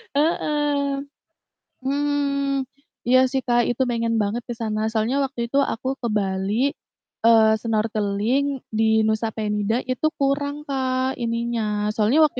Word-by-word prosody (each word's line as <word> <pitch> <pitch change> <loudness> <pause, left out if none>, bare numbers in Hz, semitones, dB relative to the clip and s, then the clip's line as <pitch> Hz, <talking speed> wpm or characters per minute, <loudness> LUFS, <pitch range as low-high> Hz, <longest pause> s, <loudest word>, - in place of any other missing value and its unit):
Heeh. 290 -2 +1 0.8
Hmm, 280 0 0 0.4
iya 255 +1 +6
sih, 265 - 0
Kak, 240 0 +4
itu 245 +2 -1
pengen 230 -1 0
banget 210 +4 -1
ke - - -1
sana 215 -1 -1
soalnya 220 +4 0
waktu 270 -3 -5
itu 275 - +1
aku 255 +3 -5
ke 240 - -1
Bali, 190 0 -1 0.7
eee, 225 -1 +7 0.2
snorkeling 215 +2 0 0.3
di 220 - +3 0.2
Nusa 220 +1 0
Penida 210 0 -1 0.2
itu 255 +4 -2
kurang, 285 +1 0
Kak, 260 -1 -1
ininya. 235 0 -1 0.3
Soalnya 220 +7 +3
waktu 285 -4 -2
240 Hz, 130 wpm, -23 LUFS, 220-275 Hz, 0.8 s, eee